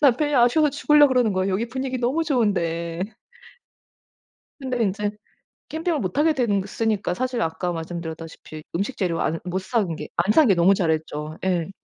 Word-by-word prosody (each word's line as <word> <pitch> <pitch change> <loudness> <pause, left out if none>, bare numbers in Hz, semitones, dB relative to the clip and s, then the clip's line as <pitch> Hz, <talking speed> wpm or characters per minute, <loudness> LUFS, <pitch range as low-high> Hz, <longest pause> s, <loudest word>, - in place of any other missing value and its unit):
남편이 290 +1 +3
아쉬워서 250 +6 +4
죽으려고 295 +1 +5
그러는 240 -4 +3
거예요 190 +1 0
여기 220 +5 -1
분위기 260 +1 -3
너무 255 +7 0
좋은데. 170 - 0 1.6
근데 255 -3 -1
인제 205 0 0 0.6
캠핑을 320 -1 -1
못하게 290 - +2
된 210 -7 +1 0.2
으니까 210 -5 0
사실 250 +4 -2
아까 175 +2 -2
말씀드렸다시피 160 -2 -7
음식 200 +9 -2
재료 175 -4 -1
안 165 - 0
못 180 +1 -2
사 235 +5 -1
온 170 -3 -4
게 - - -7
안 180 +5 +2
산 310 +5 +5
게 195 - +5
너무 175 +3 +4
잘했죠. 155 -3 -2
예. 180 -2 0
200 Hz, 355 characters per minute, -23 LUFS, 170-255 Hz, 1.6 s, 죽으려고